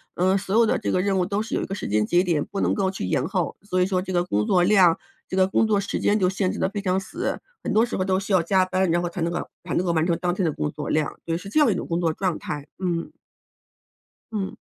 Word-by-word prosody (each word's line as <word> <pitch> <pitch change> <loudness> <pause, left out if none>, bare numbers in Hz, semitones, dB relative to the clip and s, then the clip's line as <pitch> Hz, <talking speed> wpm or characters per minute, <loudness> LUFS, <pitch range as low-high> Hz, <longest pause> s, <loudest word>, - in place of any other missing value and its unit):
嗯， 185 +2 +3
所 195 +1 -2
有 230 0 +6
的 - - +1
这 - - -2
个 185 - +2
任 195 -1 +1
务 180 - +2
都 200 +2 -1
是 220 - -6
有 - - +1
一 - - -2
个 195 - -4
时 - - -5
间 105 0 +2
节 175 +1 +3
点， 165 -5 0
不 200 - -4
能 - - +2
够 190 -2 +1
去 190 - -4
延 90 - 0
后， - - -2
所 185 -3 0
以 - - +4
说 185 -1 0
这 185 0 -5
个 175 0 +2
工 105 - 0
作 180 -2 +4
量， 180 -3 +5 0.3
这 - - -4
个 190 0 +5
工 220 +3 +2
作 205 -2 +2
时 200 - -3
间 210 - +2
就 185 -3 +2
限 190 -1 0
制 - - -6
得 - - +1
非 205 +1 -4
常 185 -2 0
死。 190 - -3 0.2
很 - - -2
多 220 +2 +4
时 240 - -4
候 185 - 0
都 190 -1 +2
需 200 +1 -4
要 185 - +5
加 185 +3 +3
班， 185 -1 0
然 175 +1 +2
后 175 - -1
才 180 - -7
能 170 +1 0
够 - - -1 0.3
才 - - -3
能 180 - +1
够 175 - +1
完 160 0 +1
成 170 -2 +1
当 175 -1 +1
天 185 -1 -1
的 160 - +1
工 150 - -2
作 150 +1 -6
量。 155 -2 +1 0.2
所 165 - -1
以 - - 0
是 195 +2 -9
这 310 - +2
样 295 - +5
一 200 - +1
种 - - -3
工 170 0 -1
作 165 -2 +1
状 185 -1 -1
态， 145 -1 -5 0.2
嗯。 170 -2 -2 1.2
嗯。 200 -3 -3
185 Hz, 335 characters per minute, -24 LUFS, 170-195 Hz, 1.2 s, 有